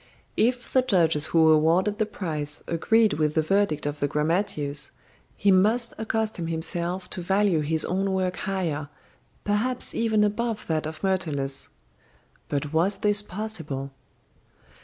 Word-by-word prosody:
If 245 +2 0
the 260 - +5
judges 165 - +2
who 160 -1 +4
awarded 170 +7 +3
the 215 - +1
prize 155 -8 -5
agreed 215 +6 +2
with 150 -1 0
the 160 - +3
verdict 195 -4 +1
of 145 0 -3
the 145 - +1
grammateus, 150 -2 -1 0.5
he 200 - +3
must 220 +6 +3
accustom 220 -5 -2
himself 170 +2 -3
to 180 - -5
value 195 -1 +2
his 155 +1 +1
own 195 +2 -1
work 185 -1 -1
higher, 170 -7 -2 0.5
perhaps 225 +5 0
even 220 -2 +2
above 215 +1 -1
that 155 -1 -1
of 155 +2 -8
Myrtilus. 150 -8 0 0.8
But 145 +1 -2
was 180 +5 +2
this 205 0 +3
possible? 180 -10 -4
180 Hz, 140 wpm, -25 LUFS, 155-210 Hz, 0.8 s, the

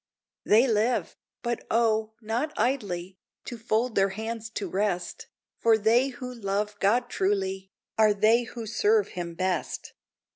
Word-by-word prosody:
They 230 +5 +5
live! 225 +2 +1 0.3
but 240 -1 -2
O, 220 -1 +1
not 235 +8 -2
idly, 195 -7 -1 0.3
To 245 - -6
fold 225 +1 0
their 195 -1 +3
hands 220 +2 -5
to 200 - -2
rest, 185 0 -2 0.3
For 225 -1 +4
they 230 +5 +3
who 250 -1 -7
love 210 -2 -2
God 235 +5 +2
truly, 190 -1 -1 0.3
Are 215 -1 +6
they 225 +4 +4
who 230 0 -7
serve 420 - +2
him 170 -1 -6
best. 185 -2 -2
220 Hz, 140 wpm, -27 LUFS, 195-235 Hz, 0.3 s, Are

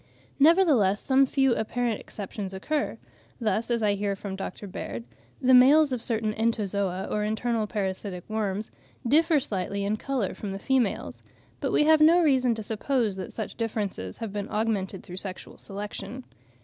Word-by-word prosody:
Nevertheless 285 - +5
some 270 0 +3
few 270 -2 +3
apparent 230 +1 -1
exceptions 195 -1 -6
occur; 295 +10 -2 0.4
thus, 225 0 0
as 235 -2 0
I 205 -1 +3
hear 200 0 -1
from 195 0 -6
Dr. 195 +1 -6
Baird, 180 - -6 0.4
the 255 0 +4
males 275 +3 +7
of 245 - -2
certain 220 -2 -1
Entozoa, 200 -4 -1
or 210 - -1
internal 220 +1 -1
parasitic 190 -3 -3
worms, 215 -1 -2 0.4
differ 315 +4 +4
slightly 200 -4 -2
in 210 +2 0
colour 255 -6 -2
from 200 -2 -5
the - - -4
females; 245 0 0 0.4
but - - -1
we - - +4
have 315 0 +5
no 335 +3 +6
reason 260 -5 +3
to 220 - -6
suppose 220 0 0
that 185 - -6
such 220 -3 -6
differences 205 - -3
have 220 -3 -5
been 205 -1 -4
augmented 205 -3 -1
through 180 -2 -9
sexual 190 -1 -6
selection. 210 +5 -6
215 Hz, 160 wpm, -27 LUFS, 200-255 Hz, 0.4 s, males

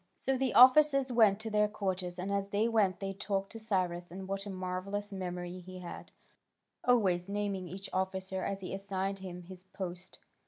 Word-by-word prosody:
So 270 - 0
the 260 0 0
officers 275 +1 +7
went 215 -4 +5
to 220 0 -5
their 210 0 +4
quarters, 185 -4 -3
and 185 +2 -3
as 200 0 -1
they 205 +3 +2
went 210 -5 +2
they 195 -1 -3
talked 195 0 -2
of 225 - -5
Cyrus, 180 -5 -1
and 190 +2 -7
what 195 +1 -3
a - - -5
marvellous 190 +2 -4
memory 180 -1 -4
he 185 +1 -10
had, 180 -1 -8 0.7
always 195 -7 +3
naming 200 -2 -2
each 190 +3 -7
officer 190 0 -1
as 195 0 -3
he 185 - -5
assigned 195 0 -2
him 180 -2 -7
his 180 +1 -11
post. 185 -1 -6
195 Hz, 185 wpm, -32 LUFS, 185-205 Hz, 0.7 s, officers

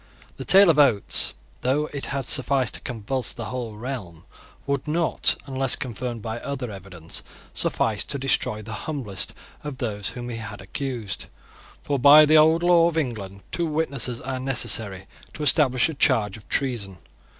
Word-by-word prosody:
The - - -7
tale 195 -2 +7
of 150 - 0
Oates, 125 -9 +3 0.3
though 140 +4 +1
it 140 - -4
had 135 -2 -3
sufficed 130 -1 +2
to - - -2
convulse 125 +2 -3
the 115 - -6
whole 120 -3 -5
realm, 105 -9 -7 0.4
would 140 +1 -2
not, 165 +2 +2
unless 135 -1 +2
confirmed 120 -2 -5
by 115 +1 -4
other 130 -4 -5
evidence, 90 -4 -8 0.3
suffice 110 -3 0
to 140 - +2
destroy 125 -5 0
the 110 +1 -7 0.2
humblest 110 -11 -3 0.3
of 145 -3 -6
those 105 -5 -3
whom 120 -1 -7
he 115 - -5
had 105 -2 -7
accused. 110 0 -4 0.6
For, 140 -2 -1
by 145 +4 +8
the 155 +1 +4
old 160 +2 +4
law 175 -1 +5
of 165 -1 -2
England, 100 -9 -4
two 170 -1 -1
witnesses 140 -6 -2
are 130 0 -4
necessary 110 -7 0 0.3
to 150 - -5
establish 135 -4 +4
a 160 - -5
charge 115 -8 +2
of 110 - -15
treason. 115 -9 0
130 Hz, 165 wpm, -24 LUFS, 110-140 Hz, 0.6 s, by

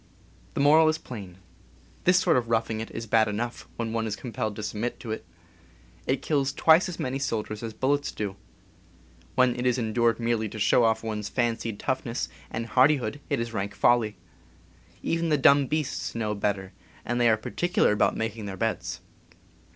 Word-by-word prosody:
The - - -1
moral 155 +2 +6
is 155 - +1
plain. 100 - -9 0.7
This 180 0 +6
sort 180 -3 +3
of 120 -2 0
roughing 115 -1 0
it 110 - -5
is 115 - -6
bad 110 0 +3
enough 115 +3 -4
when 115 -1 -3
one 115 -1 -1
is 105 - -2
compelled 110 -1 -4
to 110 - -6
submit 105 +3 -3
to 115 - -6
it. 110 - -4 0.8
It 130 0 0
kills 140 -3 +1
twice 160 +6 +5
as 175 - -6
many 130 +1 -2
soldiers 110 -5 -3
as 115 -1 -4
bullets 140 +4 0
do. 100 -2 -4 1.0
When 125 -1 +4
it 125 +1 -1
is 125 0 +2
en 110 -3 -2
dured 115 -1 +2
merely 115 -2 0
to 110 - -8
show 110 +3 +4
off 110 0 +1
one's 105 -2 -3
fancied 115 -3 -1
toughness 130 -2 -2 0.2
and 115 +1 -3
hardihood 130 +1 +3
it - - +1
is 115 0 -3
rank 100 -1 -3
folly. 115 -3 +3 0.9
Even 165 0 0
the 150 - +3
dumb 140 0 +5
beasts 155 -5 -2
know 110 -2 -1
better, 100 -2 -2 0.3
and 120 +1 0
they 120 - +5
are 110 - +4
particular 175 +9 +1
about 105 - +2
making 110 -1 -3
their 95 -1 -6
beds. 115 +3 -2
115 Hz, 185 wpm, -27 LUFS, 110-130 Hz, 1.0 s, moral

